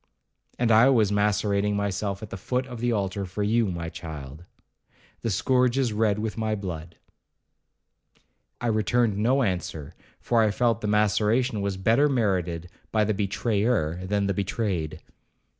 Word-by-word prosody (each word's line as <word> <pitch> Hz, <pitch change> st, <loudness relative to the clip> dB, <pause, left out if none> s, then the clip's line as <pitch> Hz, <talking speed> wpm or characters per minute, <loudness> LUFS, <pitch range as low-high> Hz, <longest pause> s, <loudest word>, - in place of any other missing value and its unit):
'And 120 Hz, -2 st, +2 dB
I 115 Hz, +4 st, +7 dB
was 110 Hz, -6 st, +3 dB
macerating 105 Hz, 0 st, +1 dB
myself 100 Hz, 0 st, -2 dB
at 110 Hz, -, -8 dB
the -, -, -4 dB
foot 125 Hz, +7 st, -2 dB
of 125 Hz, -3 st, -8 dB
the 120 Hz, +1 st, 0 dB
altar 100 Hz, -2 st, -1 dB
for 95 Hz, +2 st, -4 dB
you, 110 Hz, +2 st, +2 dB
my 85 Hz, -3 st, -4 dB
child,—the 80 Hz, -, -10 dB
scourge 125 Hz, +5 st, +2 dB
is 125 Hz, -5 st, +1 dB
red 105 Hz, -1 st, +1 dB
with 110 Hz, +1 st, -3 dB
my 110 Hz, -1 st, 0 dB
blood.' 85 Hz, -5 st, -6 dB, 1.6 s
I -, -, -5 dB
returned 110 Hz, -1 st, +1 dB
no 130 Hz, +5 st, +3 dB
answer, 90 Hz, -, -3 dB, 0.3 s
for 115 Hz, -2 st, +2 dB
I 110 Hz, -, +3 dB
felt 115 Hz, +2 st, +1 dB
the 105 Hz, -, -2 dB
maceration 105 Hz, +3 st, +2 dB
was 100 Hz, -1 st, -2 dB
better 115 Hz, +9 st, +3 dB
merited 90 Hz, -, 0 dB, 0.2 s
by 110 Hz, -1 st, +2 dB
the 110 Hz, +1 st, +1 dB
betrayer 100 Hz, -3 st, 0 dB
than 100 Hz, +1 st, 0 dB
the 100 Hz, -, 0 dB
betrayed. 90 Hz, -6 st, -2 dB
105 Hz, 150 wpm, -26 LUFS, 95-115 Hz, 1.6 s, I